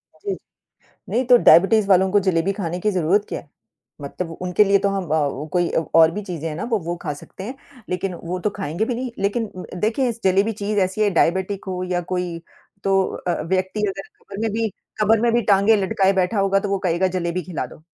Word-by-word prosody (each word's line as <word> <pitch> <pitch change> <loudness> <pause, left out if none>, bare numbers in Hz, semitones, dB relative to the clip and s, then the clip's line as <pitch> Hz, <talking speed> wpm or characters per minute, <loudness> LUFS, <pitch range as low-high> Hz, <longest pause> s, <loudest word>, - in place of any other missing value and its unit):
अ, - - -23
जी। 400 - -2 0.7
नहीं 255 +2 0
तो 245 0 +7
डायबिटीज़ 195 +5 +6
वालों 190 0 +4
को 205 - +5
जलेबी 175 +1 +2
खाने 175 +1 -3
की 210 +3 +1
ज़रूरत 185 +3 +2
क्या - - -3
है? 145 - -18 0.5
मतलब 165 +4 -5
उनके 185 +3 +3
लिए 200 0 +4
तो 200 - +3
हम 195 -1 -2
अ, 150 -1 -1
कोई 175 -1 +2 0.3
और 165 0 +7
भी 210 - -4
चीज़ें 165 -4 -5
हैं 150 - -5
ना - - -4
वो, 220 - +2
वो 170 +1 -4
खा 150 - -3
सकते 165 +6 -11
हैं। 250 +6 -6 0.3
लेकिन 180 +1 -2
वो 175 +1 -5
तो 205 - 0
खाएँगे 190 +3 -2
भी 245 - -2
नहीं 250 0 -4
लेकिन 210 +3 -1 0.3
देखिए 235 +4 +1
इस 230 0 -5
जलेबी 195 +3 +3
चीज़ 210 0 0
ऐसी 190 +3 -4
है 210 - +4
डायबिटिक 190 +3 0
हो 185 -1 -3
या 175 - 0
कोई 180 -2 -2 0.5
तो 195 0 +3 0.3
अ, 175 - 0
व्यक्ति 190 +5 -1
अगर 195 0 -5
कब्र 195 - -10
में 225 -1 0
भी 225 +1 -1 0.3
कब्र 215 +1 +4
में 235 -1 +3
भी 240 - +3
टाँगे 200 +3 +5
लटकाए 195 -1 +2
बैठा 190 +2 +1
होगा 195 0 +3
तो 200 -1 -4
वो 200 - +1
कहेगा 175 +3 +2
जलेबी 175 +1 -2
खिला 175 -1 -4
दो। - - -14
190 Hz, 225 wpm, -21 LUFS, 175-210 Hz, 0.7 s, तो